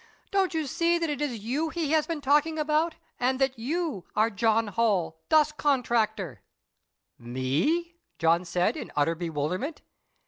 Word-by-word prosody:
Don't 380 -3 +1
you 315 -1 0
see 335 +5 +1
that 330 -2 -1
it 290 -1 -3
is 245 -8 -2
you 285 +8 -1
he 315 -2 -2
has 315 -1 +3
been 330 -3 -3
talking 295 +3 +3
about, 310 +2 +1 0.2
and 255 +1 +1
that 265 -2 0
you 295 - -2
are 220 +2 +3
'John 220 +1 +2
Holl, 195 -8 0
Dust 305 -1 +4
Contractor'?" 225 - 0 0.8
"Me?" 140 - 0 0.2
John 165 +2 +3
said, 175 0 0
in - - -6
utter 150 +3 +2
bewilderment. 170 - -3
255 Hz, 150 wpm, -27 LUFS, -, 0.8 s, Dust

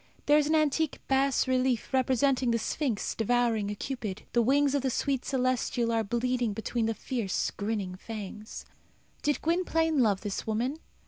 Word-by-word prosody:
There 295 +1 +6
is 295 - +1
an 315 - +2
antique 310 0 +1
bas 270 0 +2
relief 255 -1 0
representing 260 0 +2
the 230 - +2
Sphinx 235 -1 -2
devouring 225 -2 +1
a 205 - -3
Cupid. 215 -5 -5
The 240 - +4
wings 280 +4 +3
of 285 - +1
the 265 - 0
sweet 265 +1 -1
celestial 255 -2 0
are 225 -1 +1
bleeding 240 +1 0
between 225 +2 -1
the 225 - -1
fierce, 230 -7 -2
grinning 200 -3 -3
fangs. 210 +1 -8 0.6
Did 295 -1 0
Gwynplaine 325 -2 +1
love 210 -6 +3
this 205 -1 -4
woman? 245 +8 -1
245 Hz, 165 wpm, -29 LUFS, 220-275 Hz, 0.6 s, There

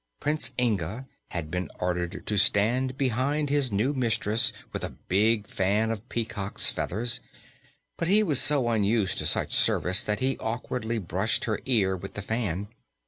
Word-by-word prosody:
Prince 150 +1 0
Inga 110 0 -1 0.2
had 80 -3 -5
been 90 +1 -2
ordered 90 -1 -2
to 105 - -1
stand 120 +6 +2
behind 140 +3 0
his 140 -4 +3
new 110 +8 +1
mistress 115 -4 +1 0.2
with - - -4
a - - -2 0.2
big 105 +3 +2
fan 105 +5 0
of 115 +2 -6
peacock's 110 -4 -1
feathers, 120 +6 0 0.8
but 170 - 0
he 210 +4 +5
was 150 -10 +3
so 140 -3 +4
unused 105 -2 +1
to - - 0
such - - +1
service 90 +3 +3
that 105 0 -1
he 135 +1 0
awkwardly 115 0 -3
brushed 95 +2 -1
her 110 -2 -1
ear 105 -8 +3
with 95 +2 -8
the 105 - -5
fan. 100 -3 -2
110 Hz, 160 wpm, -27 LUFS, 100-130 Hz, 0.8 s, he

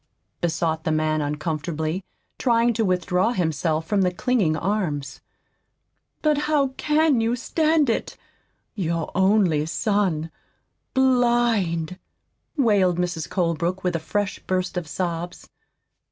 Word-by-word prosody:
besought 165 -2 0
the 160 - 0
man 155 0 +1
uncomfortably, 155 +3 -2 0.4
trying 235 -1 +3
to 225 0 0
withdraw 185 +3 +1
himself 160 - 0
from 200 +4 +1
the 180 -1 +2
clinging 190 -6 +1
arms. 175 -7 -2 1.0
"But 300 -2 +3
how 285 -3 +3
CAN 300 -1 +2
you 230 +2 +1
stand 310 +4 +1
it! 230 - -2 0.6
your 170 -5 -2
only 190 -6 +3
son 175 -5 0 0.6
blind!" 235 -10 +2 0.6
wailed 200 - +3
Mrs. 175 -3 -2
Colebrook, 175 0 -1
with 180 -2 0
a - - 0
fresh 200 +5 -2
burst 185 -1 -2
of 175 -3 -3
sobs. 175 +2 -4
180 Hz, 115 wpm, -23 LUFS, 160-230 Hz, 1.0 s, trying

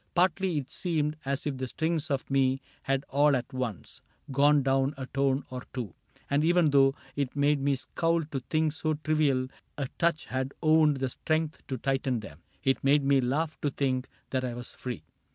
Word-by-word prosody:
Partly 180 -1 +2
it 135 -3 -4
seemed 155 -4 0
As 140 +1 -1
if 145 -3 -2
the 130 0 -3
strings 160 +3 -1
pf 140 -3 -1
me 135 -1 +2 0.2
had 135 +1 -1
all 145 +1 +4
at 130 +2 -3
once 125 -8 -5 0.3
Gone 145 +1 +4
down 135 +2 +2
a 130 - -4
tone 135 +1 +1
or 125 0 -4
two; 115 -8 -4 0.3
and 145 +1 +2
even 170 -2 +4
though 135 -1 +5 0.2
It 140 -2 -2
made 145 0 +2
me 140 0 +2
scowl 165 +5 0
to 145 -2 -4
think 155 -1 +2
so 155 0 -1
trivial 145 -4 +1 0.3
A 140 -2 -2
touch 170 -2 +2
had 130 +1 -3
owned 155 -2 +5
the 135 -1 -1
strength 155 +3 -1
to 130 - -3
tighten 130 -2 0
them, 85 -6 -11 0.2
It 135 0 +1
made 140 +1 +4
me 135 -1 +4
laugh 145 +5 -1
to 145 - +1
think 130 -2 -1 0.2
that 130 -1 0
I 125 -2 -3
was 120 0 -8
free. 125 -4 -6
140 Hz, 190 wpm, -29 LUFS, 130-155 Hz, 0.3 s, though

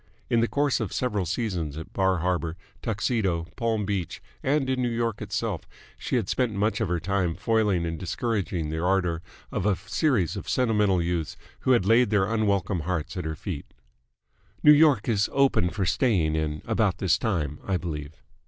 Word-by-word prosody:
In 115 - +4
the 115 - +3
course 145 0 +1
of 110 -6 -3
several 105 -8 -1
seasons 90 -7 -2
at 80 - -8
Bar 95 -1 +2
Harbor, 85 -2 -1 0.2
Tuxedo, 100 -6 0
Palm 115 -4 0
Beach, 95 -4 -3 0.2
and 135 0 +1
in 130 -1 0
New 120 - +1
York 115 -2 -1
itself, - - -3 0.3
she - - -3
had 115 -6 +1
spent 120 -2 0
much 105 +3 0
of - - +1
her 90 0 0
time 90 -1 0
foiling 105 -6 +1
and 80 -1 -3
discouraging 95 -4 -2
the 80 0 -2
ardour 90 -3 +1 0.3
of 95 - -1
a 105 - +3
series 115 - 0
of - - -6
sentimental 105 -7 +2
youths 85 -2 -2 0.2
who 130 - +3
had 115 -7 +3
laid 115 +2 +5
their 100 -3 +3
unwelcome 100 -4 0
hearts 80 +2 -3
at 90 - -4
her 80 0 -3
feet. 80 -2 -7 0.9
"New 150 - +9
York 145 -7 +4
is 105 -4 +2
open 135 -10 +3
for 95 +3 -2
staying 90 - +2
in 75 -1 -2
about 110 -5 +1
this 95 -3 +2
time, 80 - -1
I 95 -2 0
believe." 75 -4 -6
100 Hz, 180 wpm, -26 LUFS, 85-115 Hz, 0.9 s, New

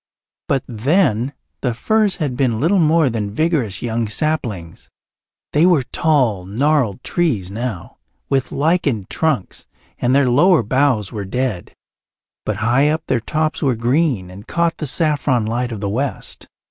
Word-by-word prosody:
But 135 -2 +1
then 130 - +1 0.3
the 120 -2 -1
firs 215 - +1
had 145 -7 -2
been 120 -4 +1
little 175 +8 +3
more 160 -1 +4
than 110 -4 -2
vigorous 155 - 0
young 115 -1 -1
saplings; 110 - -3 0.6
they 150 - +4
were 175 -6 +4
tall, 125 - +1
gnarled 120 +1 0
trees 120 - 0
now, 110 -4 -5 0.3
with 135 -2 0
lichened 145 - 0
trunks, 145 - -1 0.3
and 125 +2 +2
their 140 -2 +4
lower 150 +3 +4
boughs 125 -3 +1
were 105 -3 -4
dead. 120 -3 -3 0.7
But - - 0
high 135 +5 +3
up 155 +1 -1
their 125 - +1
tops 155 +6 -1
were 135 -5 +2
green 120 - 0
and 100 +4 -12
caught 170 -1 0
the 155 - -4
saffron 145 -6 +1
light 120 +2 -2
of 110 -3 -5
the 100 - -2
west. 130 +7 -4
130 Hz, 150 wpm, -19 LUFS, 110-155 Hz, 0.7 s, more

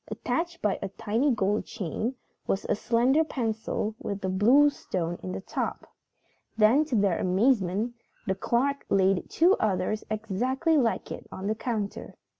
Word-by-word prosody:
Attached 340 0 -3
by 210 -2 +1
a - - -3
tiny 225 +8 0
gold 210 -4 +1
chain 220 +5 -3 0.3
was 195 - -1
a - - +1
slender 245 +8 +2
pencil 220 -6 -2
with 200 -1 -4
a - - 0
blue 245 +10 +5
stone 175 -9 -4
in 185 - -5
the - - -4
top. - - -4 0.7
Then, 230 +8 +5
to 285 -5 -2
their 200 -5 +2
amazement, 200 +2 +1 0.3
the 190 - +1
clerk 255 +8 0
laid 190 -1 +2
two 350 +4 +4
others 215 0 0
exactly 240 - 0
like 240 -6 +1
it - - -7
on 190 - -6
the 210 - +1
counter. 220 -3 -4
220 Hz, 155 wpm, -27 LUFS, 195-260 Hz, 0.7 s, blue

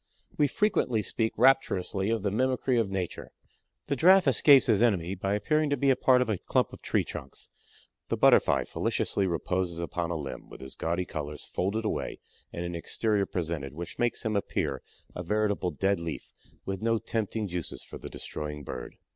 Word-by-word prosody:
We 145 - +3
frequently 130 - +1
speak 110 +3 0
rapturously 100 -7 +2
of 115 -3 0
the 100 - 0
mimicry 130 +3 +1
of 110 -4 0
Nature. 95 -3 -4 0.6
The 140 - -1
Giraffe 180 +4 +6
escapes 135 +1 +6
his 110 -5 +3
enemy 95 -7 +2
by 100 +1 -1
appearing 155 +7 +1
to 145 - +1
be 135 +1 +3
a - - +4
part 125 -1 +4
of - - -9
a 100 -5 0
clump - - 0
of - - -11
tree - - +1
trunks, - - -9 0.6
the - - -1
Butterfly - - +5
felicitously 100 -1 -1
reposes 90 0 -1
upon 85 0 -3
a 85 - -2
limb 70 -4 -6
with - - -11
his 65 0 -9
gaudy 85 +2 -2
colors 75 -2 -6
folded 105 +5 -2
away - - -2 0.3
and 85 - -4
an 85 - -4
exterior 100 +4 0
presented 80 -6 -3
which 85 +1 -7
makes 120 0 0
him 110 -1 0
appear 75 -8 -1 0.3
a - - -4
veritable 105 0 0
dead 95 +5 0
leaf 85 -2 -6 0.3
with 95 -1 -4
no 115 0 +2
tempting 110 -1 -2
juices 90 -3 -5
for - - -10
the - - -8
destroying 75 -1 -6
Bird. 65 -2 -7
100 Hz, 185 wpm, -28 LUFS, 85-115 Hz, 0.6 s, Giraffe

